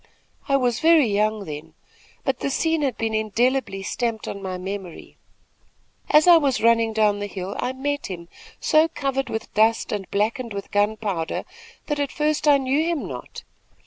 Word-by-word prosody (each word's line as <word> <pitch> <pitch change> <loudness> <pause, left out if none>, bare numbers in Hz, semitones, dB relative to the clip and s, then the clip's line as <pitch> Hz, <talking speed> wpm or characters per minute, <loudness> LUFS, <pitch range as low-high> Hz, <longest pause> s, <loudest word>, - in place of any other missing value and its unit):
I 275 - +4
was 245 -3 0
very 320 -3 +5
young 210 -1 0
then; 155 0 -8 0.5
but 265 -2 -1
the - - -1
scene 320 +3 0
has 275 -3 0
been 225 -1 -2
indelibly 220 -1 0
stamped 230 +1 -2
on 200 - -5
my 185 -1 -4
memory. 190 -1 -7 0.9
"As 300 +1 +6
I 350 -1 +8
was 275 -5 +1
running 230 -1 +4
down 210 -2 +2
the 205 - -3
hill, 195 0 -6
I 250 - -1
met 285 +2 -3
him, 170 -3 -7 0.3
so 310 +1 +4
covered 270 -4 -2
with 220 - -5
dust 225 +1 +2
and 200 -3 -4
blackened 225 +3 -1
with 200 - -6
gunpowder, 205 -5 -1 0.4
that 295 -1 -2
at 285 -2 -1
first 305 0 0
I 290 -1 +7
knew 275 +3 +1
him 335 -2 -2
not. - - -8
230 Hz, 175 wpm, -23 LUFS, 205-275 Hz, 0.9 s, I